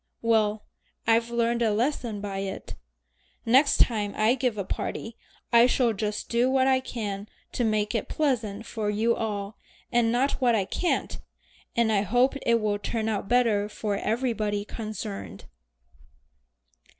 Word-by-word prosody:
Well 215 -2 +2 0.4
I've 230 +1 +3
learned 235 0 0
a 225 -2 +3
lesson 230 -2 -1
by 200 -1 -4
it. 195 0 -5 0.7
Next 265 +6 +5
time 210 -4 +2
I 215 +3 +4
give 250 -4 -1
a 200 - -1
party 225 +4 -4 0.4
I 235 +1 +7
shall 245 -2 +2
just 210 0 -3
do 240 +2 +2
what 260 0 +3
I 265 -1 +4
can 210 -5 -5 0.2
to 245 - -1
make 215 -1 +1
it 225 - -2
pleasant 225 -8 -1
for 220 -3 -3
you 220 +3 +1
all, 205 -2 -4 0.3
and 235 -1 +3
not 265 +4 0
what 240 -2 +4
I 200 -3 +1
can't, 350 - -1 0.6
and 235 -1 +3
I 205 -2 +3
hope 245 +6 +2
it 235 0 +3
will 210 -1 -1
turn 220 +1 -2
out 200 -2 -3
better 225 -4 +2
for 210 -1 -3
everybody 215 -2 -1
concerned." 180 - -6
225 Hz, 150 wpm, -26 LUFS, 210-240 Hz, 0.7 s, I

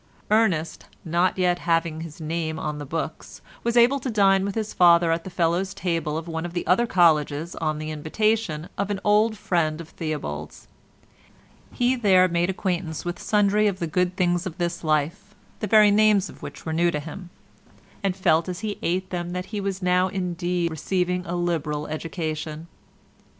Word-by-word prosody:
Ernest, 185 -8 +1 0.2
not 170 +3 +1
yet 180 -1 +2
having 165 -1 0
his 165 -1 -9
name 160 0 -3
on 150 -2 -4
the 145 - -7
books, 160 +1 -5 0.2
was 235 +1 0
able 245 +4 +5
to 260 - -4
dine 195 -3 +4
with 200 0 -3
his 215 -1 -3
father 170 -1 +5
at 165 0 0
the - - -7
Fellows' 175 +2 0
table 165 -4 -1
of 165 +1 -6
one 160 -1 -3
of 175 -1 -6
the 175 - -3
other 190 +8 +3
colleges 160 -3 +2
on 155 -1 -1
the 155 0 -5
invitation 160 +1 -1
of 200 0 -1
an 200 -2 -2
old 210 +1 +3
friend 160 -5 0
of 165 -1 -9
Theobald's; 75 - -5 1.0
he 250 +1 +1
there 190 -6 +4
made 175 0 0
acquaintance 180 -4 -2
with 175 0 -4
sundry 210 0 +3
of 195 -2 -1
the 170 - -2
good 180 +3 0
things 175 0 +1
of 170 -1 -8
this 175 -1 -2
life, 160 +7 -1 0.2
the 210 - -2
very 210 0 +6
names 210 -2 +4
of - - -14
which 140 0 -9
were 160 - -2
new 170 +2 +3
to 150 - -2
him, 170 +4 -8 0.7
and 195 -3 0
felt 170 -2 +2
as 180 - -5
he 210 -2 -4
ate 185 +2 -1
them 175 -1 -3
that 180 0 -3
he 205 - -2
was 195 -1 -3
now 180 +1 +3
indeed 175 -2 -2
receiving 180 +3 -1
a 175 - -2
liberal 160 -4 -1
education. 155 0 -4
175 Hz, 185 wpm, -24 LUFS, 160-195 Hz, 1.0 s, very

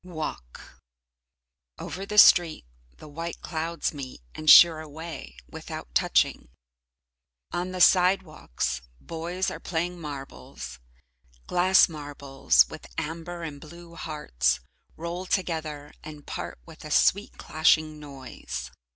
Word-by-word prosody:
Walk 155 - -8 1.0
Over 190 +6 -6
the 210 - -4
street 175 - +7 0.3
the - - -12
white 165 +3 -6
clouds 165 0 -3
meet, 135 -3 -8
and 155 0 -1
sheer 165 -1 +9
away 160 +2 -9
without - - -8
touching. 60 - +2 1.0
On 180 +1 -3
the 185 -1 -3
sidewalks, 180 - +2 0.2
boys 170 - -3
are - - -7
playing 175 +1 -3
marbles. 70 - -8 0.7
Glass 185 +1 +5
marbles, 140 - +1
with - - -10
amber 170 +2 -5
and 145 -3 -7
blue 170 +2 -12
hearts, 105 - -1 0.4
roll 170 +3 -5
together 155 -6 -3
and 150 -2 -10
part - - -6
with - - -13
a - - -8
sweet - - +2
clashing 155 -1 +2
noise. 140 -3 -8
160 Hz, 115 wpm, -26 LUFS, 145-175 Hz, 1.0 s, sheer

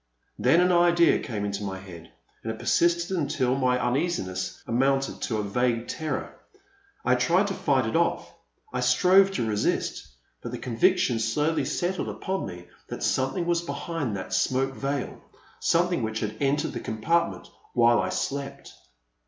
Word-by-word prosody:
Then 170 - +4
an 180 0 +3
idea 175 -1 +4
came 105 -5 -4
into 100 0 -3
my 95 -1 -4
head, 90 -4 -12 0.3
and 110 - -3
it 110 - -7
persisted 170 +6 +1
until 135 -6 0
my 130 -2 +2
uneasiness 120 - -2
amounted 135 +3 0
to 110 - -1
a 105 - -1
vague 120 +3 0
terror. 155 -1 -4 0.7
I - - +4
tried - - +3
to - - -2
fight - - +1
it - - -2
off - - 0 0.2
— 435 - -34
I - - -1
strove 190 +1 +5
to 120 - -1
resist 105 -1 -1 0.2
— - - -43
but - - -6
the - - -4
conviction 115 0 +2
slowly 150 +7 0
settled 175 +6 -2
upon 190 0 -3
me 90 -1 -9 0.2
that - - -6
something 135 +6 0
was 170 -1 +1
behind 145 - -3
that 95 - -6
smoke 130 +7 +1
veil, 140 -1 -3 0.2
— - - -28
^something 175 -3 +2
which 110 0 -2
had 110 0 -3
entered 145 +3 +1
the - - -4
compartment 110 - -1 0.3
while 120 0 +5
I 95 - -2
slept. 140 +7 -4
130 Hz, 170 wpm, -26 LUFS, 110-170 Hz, 0.7 s, strove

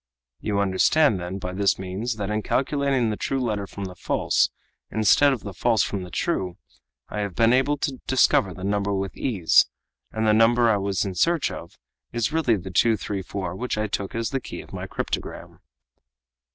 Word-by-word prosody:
"You 100 +2 -1
understand, 100 +5 +3
then, 90 +2 -5
by 90 -1 -5
this 100 0 +2
means, 95 +6 -3
that 105 -1 -3
in 105 0 0
calculating 135 -2 +1
the - - -2
true 135 +5 -2
letter 105 -5 -2
from 100 - -7
the 90 - -7
false, 90 - +1 0.4
instead 110 +7 +4
of 130 - -2
the 100 - -7
false 115 +3 +2
from 100 - -3
the 90 - -8
true, 90 - -2 0.5
I 105 - -4
have 100 -3 -3
been 115 +1 +4
able 135 +3 +2
to 135 -2 -3
discover 120 -6 +3
the 90 +1 -9
number 100 0 0
with 95 -1 -3
ease; 95 -11 +3 0.4
and 110 0 -1
the 110 - +4
number 115 +1 +4
I 105 - +3
was 100 0 -1
in 95 - -3
search 165 - +1
of 85 - -9 0.3
is 120 +5 -1
really 155 -8 +2
the 95 -1 -6
234 95 -3 0
which 125 +2 -3
I 110 - 0
took 100 -1 -4
as 115 0 -2
the 135 -1 -1
key - - -7
of - - -16
my - - -5
cryptogram." - - -5
105 Hz, 190 wpm, -24 LUFS, 95-120 Hz, 0.5 s, instead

